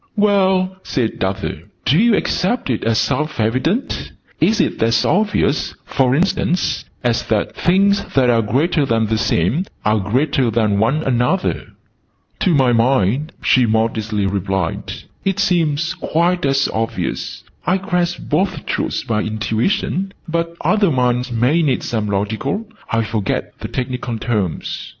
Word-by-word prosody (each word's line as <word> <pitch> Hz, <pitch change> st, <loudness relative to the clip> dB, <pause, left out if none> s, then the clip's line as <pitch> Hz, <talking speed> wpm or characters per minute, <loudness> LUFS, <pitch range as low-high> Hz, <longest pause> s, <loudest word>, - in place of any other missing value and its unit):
"Well," 190 Hz, -3 st, +2 dB
said 120 Hz, -, -2 dB
Arthur, 95 Hz, 0 st, -2 dB, 0.3 s
"do 150 Hz, -, +4 dB
you 230 Hz, 0 st, +5 dB
accept 190 Hz, -, 0 dB
it 115 Hz, -, -2 dB
as 115 Hz, 0 st, +1 dB
self 145 Hz, +5 st, -1 dB
evident? 130 Hz, -, -1 dB, 0.3 s
Is 220 Hz, -, +3 dB
it -, -, 0 dB
as 115 Hz, 0 st, +3 dB
obvious, 205 Hz, -7 st, +1 dB
for 130 Hz, -1 st, +2 dB
instance, 180 Hz, +1 st, 0 dB, 0.2 s
as 120 Hz, -2 st, +1 dB
that 110 Hz, -2 st, 0 dB
'things 200 Hz, +3 st, +3 dB
that 130 Hz, -2 st, +4 dB
are 115 Hz, -2 st, +4 dB
greater 145 Hz, +9 st, +1 dB
than 115 Hz, -4 st, +1 dB
the 110 Hz, 0 st, 0 dB
same 110 Hz, -, +1 dB, 0.2 s
are 105 Hz, +1 st, +3 dB
greater 125 Hz, +5 st, +1 dB
than 110 Hz, -3 st, +1 dB
one 135 Hz, +9 st, +1 dB
another'?" 130 Hz, +8 st, 0 dB, 0.7 s
"To 190 Hz, -, +2 dB
my 130 Hz, -3 st, +4 dB
mind," 125 Hz, -, +2 dB
she 125 Hz, -2 st, +4 dB
modestly 110 Hz, -2 st, 0 dB
replied, 95 Hz, -2 st, -2 dB, 0.3 s
"it 195 Hz, 0 st, 0 dB
seems 170 Hz, -5 st, +1 dB
quite 170 Hz, -1 st, 0 dB
as 135 Hz, 0 st, +2 dB
obvious. 115 Hz, 0 st, -3 dB, 0.2 s
I 185 Hz, -, +3 dB
grasp 180 Hz, -2 st, -1 dB
both 185 Hz, 0 st, 0 dB
truths -, -, -2 dB
by 115 Hz, -4 st, 0 dB
intuition. 115 Hz, -, -1 dB
But 170 Hz, +1 st, -2 dB
other 200 Hz, +4 st, +3 dB
minds 125 Hz, -2 st, +1 dB
may 125 Hz, +8 st, +2 dB
need 140 Hz, -6 st, +1 dB
some 110 Hz, -3 st, -2 dB
logical 110 Hz, -, -2 dB, 0.2 s
I 115 Hz, 0 st, +1 dB
forget 110 Hz, -3 st, -2 dB
the -, -, -5 dB
technical 125 Hz, -2 st, -3 dB
terms." 105 Hz, -7 st, -2 dB
130 Hz, 140 wpm, -19 LUFS, 110-175 Hz, 0.7 s, you